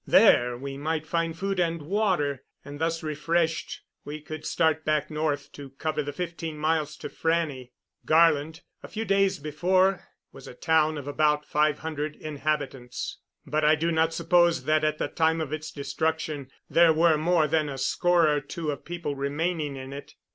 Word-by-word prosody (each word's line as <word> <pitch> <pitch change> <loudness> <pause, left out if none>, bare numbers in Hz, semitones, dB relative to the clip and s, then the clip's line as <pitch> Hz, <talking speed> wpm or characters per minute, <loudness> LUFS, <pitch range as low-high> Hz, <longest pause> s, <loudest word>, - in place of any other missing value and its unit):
There 120 0 +5
we 135 +1 -6
might 155 +1 -2
find 165 0 -1
food 195 0 -2
and 170 -1 +1
water; 155 - 0 0.2
and, 145 0 -8
thus 165 0 -1
refreshed, 160 +2 -1 0.2
we 150 +1 -6
could 155 +1 -7
start 160 -2 +1
back 155 0 0
north 150 -2 -2
to 140 -1 -10
cover 155 -1 -1
the 145 0 -4
fifteen 165 0 -5
miles 155 -1 0
to - - -6
Frannie. 160 -6 -1 0.3
Garland, 160 0 +3 0.2
a - - -9
few 220 +1 -4
days 195 -1 +2
before, 180 +6 +1 0.2
was 135 - -12
a - - -10
town 155 +1 +2
of 145 -1 -7
about 150 0 +1
five 150 0 +2
hundred 155 -1 -4
inhabitants; 145 -4 -4 0.3
but 155 +2 -1
I 155 +1 +5
do 165 +2 0
not 160 0 +2
suppose 170 0 +3
that, 155 0 +2
at 155 0 +1
the - - -1
time 160 0 +1
of 155 -2 -3
its 155 0 -4
destruction, 145 0 -2 0.2
there 170 -1 +5
were 165 0 +4
more 160 +1 +2
than 155 -1 +1
a 135 - -5
score 170 +5 +3
or 150 -1 +2
two 155 +2 -4
of 140 - -7
people 170 -4 -4
remaining 145 +2 -2
in 135 0 -7
it. 140 - -10
155 Hz, 175 wpm, -26 LUFS, 145-165 Hz, 0.3 s, There